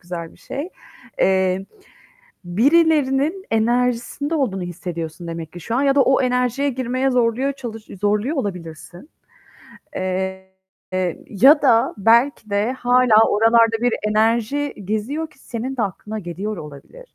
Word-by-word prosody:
güzel 170 -2 -7
bir - - -21
şey. 285 +5 -6 0.5
Eee, 190 0 +2 0.8
birilerinin 295 - +2
enerjisinde 245 +6 0
olduğunu 220 - -1
hissediyorsun 170 -1 -6
demek 165 -1 -6
ki 175 - -9
şu 225 +7 -4
an 270 - +1
ya 275 -1 +3
da 280 - +5
o 265 0 +3
enerjiye 250 +2 0
girmeye 255 +1 -1
zorluyor 250 +2 +1
çalış 235 -5 -8
zorluyor 210 +9 0
olabilirsin. 180 - -6 0.9
Eee, 190 0 -3 0.8
ya 270 +9 +5
da 235 -5 +3
belki 230 +2 +3
de 205 +4 0
hâlâ 245 -3 +3
oralarda 225 +1 +4
bir 245 -1 +1 0.2
enerji 230 +6 +1
geziyor 260 - -3
ki - - -24
senin 255 +2 -5
de 240 - 0
aklına 210 +2 -4
geliyor 195 +3 -5
olabilir. 165 - -12
230 Hz, 130 wpm, -20 LUFS, 190-270 Hz, 0.9 s, da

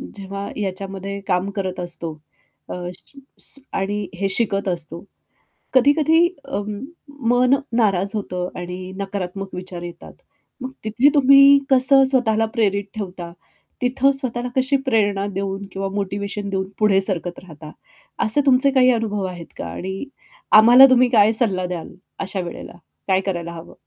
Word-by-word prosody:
जेव्हा 200 0 -6
याच्यामध्ये 195 0 -5
काम 185 +1 0
करत 190 -2 -4
असतो 170 -2 -2 0.6
अ, - - -4 0.2
सी 280 - -16 0.2
श - - +1
आणि 200 +1 -2
हे 195 +2 -1
शिकत 200 -1 -1
असतो. 170 -2 -3 0.7
कधी-कधी 310 +6 +4 0.2
अं, 205 0 -4 0.5
मन 250 +2 +4 0.2
नाराज 195 -2 +2
होतं 180 -3 -3
आणि 180 +1 -7
नकारात्मक 195 -1 -5
विचार 180 -1 -7
येतात. 175 -1 -10 0.5
मग 255 - -5
तिथे 230 +6 +3
तुम्ही 275 0 +7
कसं 270 +1 +5
स्वतःला 225 -4 +2
प्रेरित 200 -3 +1
ठेवता? 180 -5 -6 0.5
तिथं 260 +2 +2
स्वतःला 250 -2 -3
कशी 265 +2 +2
प्रेरणा 205 -5 +1
देऊन 195 0 -3
किंवा 195 +1 -3
मोटिव्हेशन 200 0 -3
देऊन 190 -1 -2
पुढे 210 -3 +4
सरकत 180 -3 -3
राहता? 155 -3 -12 0.5
असे 220 +7 +2
तुमचे 270 +1 +4
काही 255 -1 +4
अनुभव 215 -3 -2
आहेत 175 -2 -9
का - - -5
आणि 190 +1 -5 0.6
आम्हाला 240 +4 +9
तुम्ही 255 -1 +4
काय 215 -3 +5
सल्ला 200 -5 0
द्याल, 175 -2 -6 0.3
अशा 195 0 -3
वेळेला? 175 0 -8 0.3
काय 190 -1 +2
करायला 175 -3 -4
हवं? 165 -1 -11
200 Hz, 140 wpm, -21 LUFS, 185-245 Hz, 0.7 s, आम्हाला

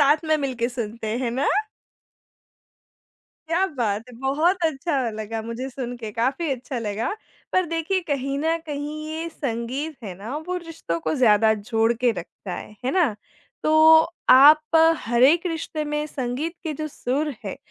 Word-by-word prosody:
साथ 290 +1 +6
में 315 0 +3
मिलके 255 -5 -1
सुनते 230 -2 -4
हैं 245 -3 -1
ना? 265 +4 0 2.0
क्या 360 +4 +2
बात 230 - -2
है! 250 - -12
बहुत 325 +7 +1
अच्छा 275 -4 0
लगा 220 +1 -5
मुझे 230 +4 -5
सुन 245 -2 -5
के, 220 -3 -6
काफ़ी 265 +8 0
अच्छा 255 0 -5
लगा। 220 - -2 0.4
पर 370 -1 +2
देखिए, 330 +4 -1
कहीं 275 -1 -1
न 325 +2 +1
कहीं, 300 +1 -5
ये 325 +1 -4
संगीत 270 +2 -4
है 190 - -6
ना, 230 +8 -5
वो 360 +4 -4
रिश्तों 330 - -4
को 160 - -1
ज़्यादा 220 -3 +5
जोड़ 225 +2 +1
के 240 +1 +1
रखता 180 +2 -7
है। 210 - -9
है 260 - +1
ना? 340 - +2 0.5
तो 315 +1 +7 0.3
आप 305 +4 +7 0.3
हर 235 +1 +1
एक 330 +7 +5
रिश्ते 320 -2 -3
में 300 0 -2
संगीत 280 +5 -3
के 320 - -2
जो 305 - -3
सुर 285 +2 -2
हैं, 195 - -4
270 Hz, 165 wpm, -23 LUFS, 235-315 Hz, 2.0 s, तो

